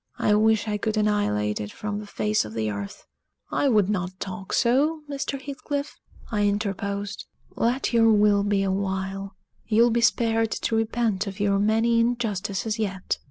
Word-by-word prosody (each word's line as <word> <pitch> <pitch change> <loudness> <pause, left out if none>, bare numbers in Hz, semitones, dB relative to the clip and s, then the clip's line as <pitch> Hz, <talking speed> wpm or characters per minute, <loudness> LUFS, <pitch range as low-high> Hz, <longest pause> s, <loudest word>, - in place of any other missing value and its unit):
I 210 - +2
wish 220 +1 +3
I 210 -1 -1
could 220 +1 -1
annihilate 105 - +1
it 105 0 -6
from 210 -1 -4
the 210 - -8
face 105 - 0
of 105 0 -8
the 110 -1 -1
earth." 100 -1 -7 0.5
"I 285 - +2
would 210 -6 +3
not 185 -2 -2
talk 190 0 -6
so, 285 +6 +2
Mr. 280 -1 -3
Heathcliff," 285 +1 -4 0.4
I 205 -2 +2
interposed. 200 0 -2 0.3
"Let 245 +2 0
your 225 -1 +5
will 205 -1 +4
be 200 -1 +1
a 195 - 0
while 195 0 -3 0.3
you'll 235 +2 +4
be 235 +1 +1
spared 225 -1 +2
to 225 - -1
repent 225 -2 0
of 200 +1 -6
your 200 -1 +2
many 225 +3 +3
injustices 220 -2 -1
yet! 195 -3 -2
210 Hz, 165 wpm, -25 LUFS, 195-230 Hz, 0.5 s, your